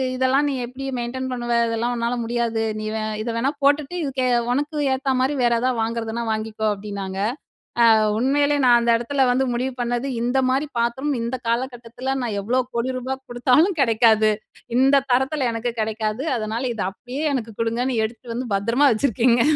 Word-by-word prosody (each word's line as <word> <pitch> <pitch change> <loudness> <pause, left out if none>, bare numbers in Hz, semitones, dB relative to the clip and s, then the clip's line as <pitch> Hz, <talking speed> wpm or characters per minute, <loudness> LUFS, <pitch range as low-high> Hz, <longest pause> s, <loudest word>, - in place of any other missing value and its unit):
இதெல்லாம் 260 +3 +2
நீ - - -1
எப்படி 255 +3 -8
மெயின்டெயின் 255 +2 -3
பண்ணுவ? 240 -1 -2
இதெல்லாம் 230 +2 -1
உன்னால 235 0 -1
முடியாது. 230 -1 -1 0.2
நீ 215 - -5
வே 220 - -2 0.2
இத 225 - -3
வேணா 240 +4 +1
போட்டுட்டு 290 +4 +2
இதுக்கு 270 -3 -1 0.3
உனக்கு 290 +4 -1 0.2
ஏத்த 265 0 0
மாதிரி 260 +3 +1
வேற 240 -1 +3
எதாவது 250 -1 0
வாங்குறதுனா 230 0 -2
வாங்கிக்கோ 220 0 -3
அப்டின்னாங்க. 200 -2 -6 0.8
அ - - +3
உண்மையிலே 285 +4 +2
நான் 240 -1 +7
அந்த 235 0 +2
இடத்தில 265 +3 +1
வந்து 260 +2 +2
முடிவு 255 +2 -2
பண்ணது, 240 +2 -1
இந்த 245 +3 +1
மாரி 270 +4 +1
பாத்திரம் 265 +5 0
இந்த 235 +3 -2
காலகட்டத்தில 245 +1 -3
நான் 220 -4 -2
எவ்வளோ 245 +6 +1
கோடி 235 +2 0
ரூபா 260 +1 -3
கொடுத்தாலும் 260 +9 +3
கிடைக்காது. 220 -3 +4 0.5
இந்த 270 +1 +4
தரத்தில 265 +2 +1
எனக்கு 230 +1 -2
கிடைக்காது. 215 +2 -2
அதனால 220 +2 -3
இத 225 - -3
அப்டியே 250 +8 -6
எனக்கு 230 -3 -4
கொடுங்கன்னு 230 +1 0
எடுத்துட்டு 230 +1 -7
வந்து 245 -2 -4
பத்திரமா 230 +8 +3
வச்சுருக்கேங்க. 235 0 +2
240 Hz, 165 wpm, -22 LUFS, 230-265 Hz, 0.8 s, நான்